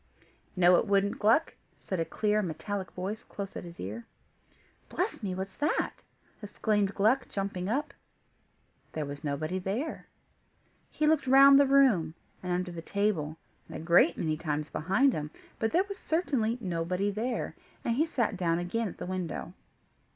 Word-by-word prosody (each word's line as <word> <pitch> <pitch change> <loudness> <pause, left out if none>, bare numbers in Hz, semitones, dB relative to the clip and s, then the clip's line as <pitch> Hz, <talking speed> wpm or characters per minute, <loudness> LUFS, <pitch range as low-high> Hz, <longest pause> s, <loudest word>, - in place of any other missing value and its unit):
"No 180 -1 +6
it - - 0
wouldn't, 200 0 +1
Gluck," 225 +10 +3 0.2
said 185 - -4
a 165 - +1
clear, 210 +3 +1
metallic 185 +2 -4
voice 195 +4 -4
close 200 -1 -7
at - - -5
his 170 -1 -11
ear. 105 +5 -6 0.8
"Bless - - -2
me! 190 -3 -3
what's 190 +1 -5
that?" 295 +2 0 0.4
exclaimed 205 -1 0
Gluck, 235 +6 +2
jumping 195 -2 -3
up. 280 +5 -1 1.0
There 155 -2 -2
was 145 +1 -7
nobody 155 +5 -2
there. 210 - -3 0.8
He 305 - -1
looked 300 -3 +3
round 275 +1 +8
the 280 - +5
room, 235 - +4 0.3
and 180 - -4
under 180 0 -1
the 170 -1 -6
table, 165 -5 -1 0.3
and - - -7
a - - -7
great 170 +1 +4
many 155 -1 -1
times 155 -1 -3
behind 230 - +2
him, 150 0 -3 0.3
but 225 -1 0
there 360 - +3
was 400 -1 -7
certainly 265 -9 0
nobody 180 0 -1
there, 230 +4 -3 0.3
and 235 - +1
he 310 +6 +2
sat 235 -9 0
down 170 -3 +1
again 195 +6 -1
at - - -8
the - - -5
window. 180 -2 -4
195 Hz, 165 wpm, -29 LUFS, 170-230 Hz, 1.0 s, round